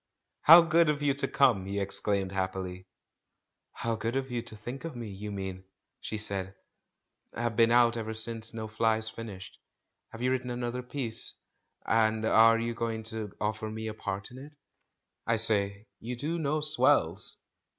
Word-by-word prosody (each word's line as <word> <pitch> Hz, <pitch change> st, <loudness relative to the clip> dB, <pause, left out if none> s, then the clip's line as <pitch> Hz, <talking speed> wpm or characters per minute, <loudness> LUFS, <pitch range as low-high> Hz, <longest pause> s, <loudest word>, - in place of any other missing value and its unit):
"How 165 Hz, +2 st, +9 dB
good 165 Hz, -1 st, +3 dB
of 150 Hz, -1 st, -1 dB
you 140 Hz, -1 st, +3 dB
to 140 Hz, -, 0 dB
come!" 115 Hz, -9 st, +2 dB
he 100 Hz, +1 st, -2 dB
exclaimed 100 Hz, -1 st, 0 dB
happily. 95 Hz, -1 st, -4 dB, 0.8 s
"How 115 Hz, -1 st, -2 dB
good 115 Hz, +3 st, -3 dB
of 135 Hz, -1 st, -2 dB
you 120 Hz, -1 st, -2 dB
to 110 Hz, -, -2 dB
think 120 Hz, +6 st, -8 dB
of 165 Hz, -5 st, -6 dB
me, 120 Hz, -2 st, -6 dB
you 105 Hz, +2 st, -7 dB
mean!" 95 Hz, -2 st, -5 dB, 0.4 s
she 110 Hz, -, -5 dB
said 100 Hz, -2 st, -4 dB, 0.4 s
— -, -, -51 dB
"I've 120 Hz, -1 st, -2 dB
been 115 Hz, 0 st, +5 dB
out 120 Hz, 0 st, +4 dB
ever 110 Hz, -1 st, -4 dB
since 110 Hz, 0 st, 0 dB
No 110 Hz, -2 st, -6 dB
Flies 110 Hz, 0 st, 0 dB
fin 115 Hz, +1 st, -8 dB
ished; 95 Hz, -3 st, -9 dB, 0.6 s
have 115 Hz, +2 st, -8 dB
you 125 Hz, -, +2 dB
written 130 Hz, -1 st, -2 dB
another 120 Hz, 0 st, -3 dB
piece, 125 Hz, -3 st, -3 dB, 0.5 s
and 110 Hz, -1 st, +2 dB
are 115 Hz, +1 st, +6 dB
you 115 Hz, +1 st, -2 dB
going 115 Hz, -1 st, -3 dB
to 110 Hz, -3 st, -5 dB
offer 110 Hz, +1 st, -2 dB
me 110 Hz, 0 st, -5 dB
a -, -, -5 dB
good -, -, -21 dB
part 95 Hz, +3 st, -4 dB
in 125 Hz, -, -10 dB
it? 145 Hz, +2 st, -12 dB, 0.7 s
I 115 Hz, -, +3 dB
say, 105 Hz, -2 st, +2 dB
you 125 Hz, +2 st, -5 dB
do 155 Hz, +7 st, -3 dB
know 155 Hz, 0 st, 0 dB
swells 150 Hz, 0 st, +3 dB
115 Hz, 180 wpm, -29 LUFS, 105-125 Hz, 0.8 s, How